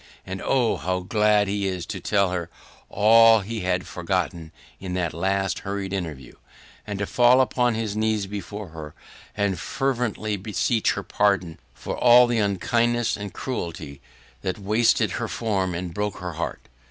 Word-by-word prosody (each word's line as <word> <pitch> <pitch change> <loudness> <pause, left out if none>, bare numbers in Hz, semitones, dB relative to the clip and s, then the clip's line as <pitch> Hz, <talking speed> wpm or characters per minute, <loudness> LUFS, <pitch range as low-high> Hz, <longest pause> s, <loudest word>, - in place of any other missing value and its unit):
And 95 0 -6
oh! 125 -4 +2
how 90 0 -2
glad 105 +1 +2
he 100 0 -1
is 90 -2 -3
to 100 - -5
tell 100 0 +1
her 85 -2 -3 0.4
all 115 +1 +6
he 110 +3 -5
had 90 -1 -1
forgotten 85 -2 -3 0.3
in 90 -1 -5
that 85 -3 -1
last 95 +3 -1
hurried 100 -1 -4
interview, 80 -9 -5 0.5
and 105 -1 -4
to 100 - -1
fall 125 +4 +4
on 125 -2 +2
his 110 -2 -3
knees 110 -1 0
before 105 0 -7
her 80 -2 -9 0.4
and 100 -3 0
fervently 120 -5 -2
beseech 110 +3 0
her - - -5
pardon 100 -5 0 0.2
for - - -5
all 125 0 +7
the 120 -1 0
unkindness 115 +4 +1
and 100 -1 -6
cruelty 80 - -5 0.4
that 95 +2 -3
wasted 110 +3 +2
her - - -3
form 95 -6 -1
and 85 0 -5
broke 105 +1 -2
her 90 -1 -5
heart! 85 +2 -5
100 Hz, 160 wpm, -24 LUFS, 90-110 Hz, 0.5 s, all